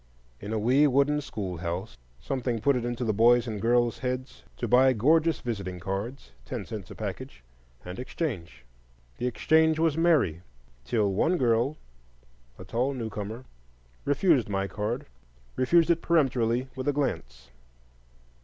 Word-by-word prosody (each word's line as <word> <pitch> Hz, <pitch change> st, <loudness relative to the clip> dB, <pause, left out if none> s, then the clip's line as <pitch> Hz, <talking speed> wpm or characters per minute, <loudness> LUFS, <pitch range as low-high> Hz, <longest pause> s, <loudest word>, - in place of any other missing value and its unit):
In 105 Hz, -, -7 dB
a 110 Hz, -, 0 dB
wee 130 Hz, +7 st, +4 dB
wooden 140 Hz, +2 st, +2 dB
schoolhouse, 95 Hz, -, -5 dB, 0.2 s
something 125 Hz, -3 st, -2 dB
put 140 Hz, +5 st, +2 dB
it 125 Hz, -, -1 dB
into 120 Hz, 0 st, -2 dB
the 110 Hz, -, +1 dB
boys' 120 Hz, +3 st, +5 dB
and 110 Hz, -4 st, -4 dB
girls' 120 Hz, 0 st, +2 dB
heads 130 Hz, 0 st, -4 dB, 0.2 s
to 120 Hz, -, -2 dB
buy 130 Hz, +3 st, +5 dB
gorgeous 155 Hz, +8 st, +3 dB
visiting 100 Hz, -6 st, -4 dB
cards—ten 95 Hz, -, -6 dB
cents 105 Hz, -6 st, -7 dB
a -, -, -9 dB
package—and -, -, -9 dB
exchange. 120 Hz, -, -5 dB, 0.5 s
The 125 Hz, -, 0 dB
exchange 160 Hz, +5 st, +3 dB
was 160 Hz, -1 st, +1 dB
merry, 150 Hz, -, +3 dB, 0.4 s
till 100 Hz, +4 st, +1 dB
one 170 Hz, -, +2 dB
girl, 120 Hz, +2 st, +1 dB, 0.8 s
a -, -, -10 dB
tall 130 Hz, +4 st, -1 dB
newcomer, 110 Hz, 0 st, -5 dB, 0.6 s
refused 145 Hz, -, +2 dB
my 95 Hz, -1 st, -1 dB
card,—refused 105 Hz, -, -1 dB
it 170 Hz, -, +1 dB
peremptorily, 130 Hz, -6 st, +1 dB
with 130 Hz, +2 st, -5 dB
a 145 Hz, -, +3 dB
glance. 65 Hz, -, -3 dB
120 Hz, 135 wpm, -27 LUFS, 95-140 Hz, 0.8 s, boys